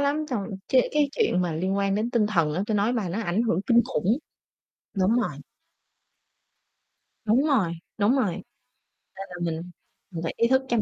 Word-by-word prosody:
lắm, 285 +2 +1
trong 205 -6 -2 0.2
chế 255 -2 +4
cái 295 -1 +3
chuyện 420 - +1
mà 175 -2 -1
liên 185 +5 -1
quan 195 0 +1
đến 215 +4 -1
tinh 235 -4 +2
thần 170 -8 +1
á, 180 - 0
tui 220 - -1
nói 205 +4 +2
bà 220 -7 -1
nó 190 +6 -2
ảnh 195 +3 0
hưởng 220 -7 +1
kinh 235 -1 +6
khủng, 220 +5 +1 0.8
đúng 195 +3 +2
rồi. - - -1 1.9
Đúng 230 +6 +3
rồi, 215 - +2 0.3
đúng 215 +6 +3
rồi, 220 -9 +1
nên - - -12 0.7
là 180 - -8
mình 170 +1 -3 0.4
mình 165 -2 -5
phải 165 - -2
ý 230 - +3
thức 265 +2 +3
chăm 235 -3 +1
210 Hz, 190 wpm, -25 LUFS, 180-240 Hz, 1.9 s, kinh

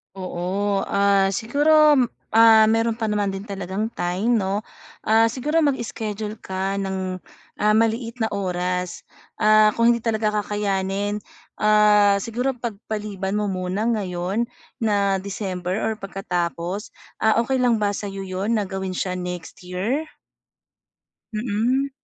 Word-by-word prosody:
Oo, 190 +2 -2
ah, 200 -1 +3
siguro, 295 +5 +4 0.3
ah, 225 0 +7
meron 225 0 +1
pa 220 -1 -2
naman 205 -1 0
din 195 0 -5
talagang 200 +1 -4
time, 195 +7 0
'no? 200 +2 -1 0.4
Ah, 225 +1 +4
siguro 275 +7 0
mag-schedule 220 -7 -2
ka 190 +1 -3
ng, 190 -1 -3 0.4
ah, 210 0 +3
maliit 230 +1 +1
na 220 - -1
oras, 180 -2 -2 0.3
ah, 215 0 +5
kung 230 0 +4
hindi 235 - +1
talaga 220 -2 0
kakayanin 205 0 -1 0.4
Ah, 210 -1 +4
siguro 245 +5 -1
pagpaliban 210 -4 -4
mo 210 0 0
muna 185 +1 -2
ngayon 195 0 -1 0.3
na 200 -5 +1
December 190 -2 -4
or 220 -1 -1
pagkatapos, 185 -1 -3 0.2
ah, 220 +1 +3
okey 265 +3 0
lang 240 -4 +2
ba 205 - +2
sa'yo 195 -1 -5
'yon 190 +3 -2
na 215 -2 +1
gawin 190 -1 -3
siya 185 0 -2
next 180 0 -7
year? 205 - -2 1.3
Mm. 235 +5 0
205 Hz, 130 wpm, -23 LUFS, 190-225 Hz, 1.3 s, ah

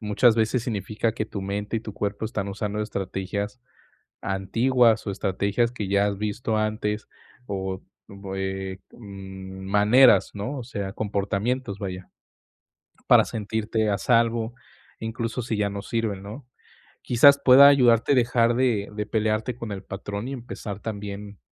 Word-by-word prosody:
muchas 110 +2 +3
veces 110 +2 +1
significa 110 -1 -2
que 110 - -3
tu 100 -2 -6
mente 100 +3 -3
y - - -9
tu 105 -3 -8
cuerpo 105 +1 -3
están 100 -2 -3
usando 105 +1 -3
estrategias 100 +3 -4 0.6
antiguas, 115 +4 +2
o 100 - -2
estrategias 100 +4 0
que 105 -5 -5
ya 100 +1 +2
has 100 -1 -1
visto 105 +2 -2
antes, 110 0 -1 0.4
o 95 -1 -4 0.3
bue, 95 -1 -5
mm, 95 -2 -9
maneras, 105 +6 +5
¿no?, 125 +8 -4
o - - -6
sea, 100 -5 -5
comportamientos, 105 +2 -2
vaya, 95 -2 -6 1.0
para - - +7
sentirte 110 0 -2
a 100 - +1
salvo, 115 +1 +1 0.5
incluso 115 +2 -3
si 110 -1 -3
ya 105 -1 0
no 100 0 -5
sirven, 105 -3 -2
¿no?, 115 +7 -9 0.6
quizás 140 +4 +6
pueda 135 +2 +9
ayudarte 125 -2 +5
dejar 120 -1 +3
de 120 -5 +1
de 105 0 -3
pelearte 110 +2 -1
con 115 -4 -6
el 95 - -6
patrón 100 +4 -6
y - - -4
empezar 115 -5 -6
también 100 -1 -6
105 Hz, 145 wpm, -25 LUFS, 100-115 Hz, 1.0 s, pueda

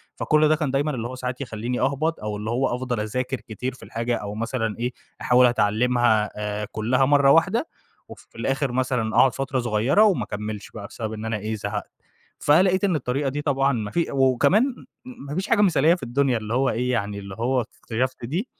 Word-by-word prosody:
فكُلّ 155 -1 +3
ده 155 - +4
كان 150 -4 -2
دايمًا 145 +2 0
اللي 120 -4 -3
هو 130 - -7
ساعات 125 0 -5
يخلّيني 120 0 -3
أهبط، 145 +5 0
أو 105 -1 -4
اللي 105 +2 -5
هو 125 +1 0
أفضل 125 -2 -3
أذاكر 125 +5 -2
كتير 125 +4 -5
في 130 - -15
الحاجة، 115 +1 -2
أو 105 0 -6
مثلًا 115 -1 -2
إيه 125 +1 -2 0.3
أحاول 125 +1 +5
أتعلمها 115 -1 +2
آآ، 105 0 -3
كلّها 125 +5 +1
مَرّة 140 0 +5
واحدة، 225 - +3 0.4
وفي - - -13
الآخر 135 0 -1
مثلًا 125 -3 -1
أقعد 125 +1 +5
فترة 135 -1 -2
صغيّرة، 120 - +3
وما 205 -5 +3
أكمّلش 105 0 -6
بقى 100 -2 -8
بسبب 110 -1 -6
إن 110 0 -6
أنا 110 -1 -1
إيه 110 +2 -4
زهقت، 105 0 -5 0.5
فلقيت 185 +6 +3
إن 190 -5 +2
الطريقة 135 0 -1
دي 145 +2 -3
طبعًا 140 -2 +1
ما 105 -3 -3
في 170 -1 -1
وكمان 135 - +3 0.4
م 250 - -10
ما 145 - -5
فيش 190 +3 -2
حاجة 225 -2 +3
مثالية 170 -4 +4
في - - -11
الدنيا، 130 0 +1
اللي 110 +1 -5
هو 130 +2 +2
إيه 125 +3 -1
يعني 100 -3 -2
اللي 100 -1 -8
هو 125 +2 +1
اكتشفت 125 +2 -4
دي 170 - -2
125 Hz, 205 wpm, -24 LUFS, 110-140 Hz, 0.5 s, أحاول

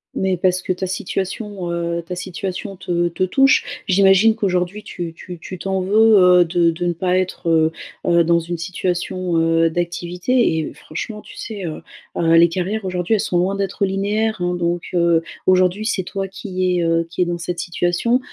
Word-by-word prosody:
Mais, 190 -1 0
parce 185 +1 +1
que - - 0
ta 185 +1 -4
situation, 190 0 -4
heu, 170 0 -2
ta 175 +2 -6
situation 190 +3 -5
te 175 -2 -1
te 170 - -2
touche, 270 +6 +2
j'imagine 195 +3 +5
qu'aujourd'hui 185 0 -1
tu 170 -5 -6
tu 175 +2 -9
tu 185 +2 -9
t'en 190 +1 -1
veux, 215 +3 +5
heu, 180 -1 +6
de 170 0 +2
de 170 +2 -4
ne 175 - +1
pas 180 +2 0
être, 185 -2 -3
heu, 160 -1 +3 0.4
heu, 170 -1 +4
dans 170 +1 +3
une 170 +1 -5
situation, 180 0 -2
heu, 165 0 +3
d'activité 175 +5 0
et 160 - -3
franchement, 210 +7 -7
tu - - -14
sais, 205 -4 -6
heu, 155 - -7 0.3
heu, 165 -1 +2
les 170 +1 +6
carrières, 190 +5 -3
aujourd'hui, 180 +2 -1
elles - - 0
sont 180 - 0
loin 185 +3 +1
d'être 195 0 -1
linéaires, 205 +2 -1
hein, 180 0 0
donc, 175 0 -1
heu, 170 -1 +3 0.2
aujourd'hui, 185 +2 +3
c'est 215 -3 0
toi 195 +1 -4
qui 185 -2 -2
es, - - 0
heu, 165 0 +1
qui 175 +2 -4
es - - +4
dans 175 0 -2
cette 170 0 -4
situation, 175 +8 0
180 Hz, 195 wpm, -20 LUFS, 170-195 Hz, 0.4 s, heu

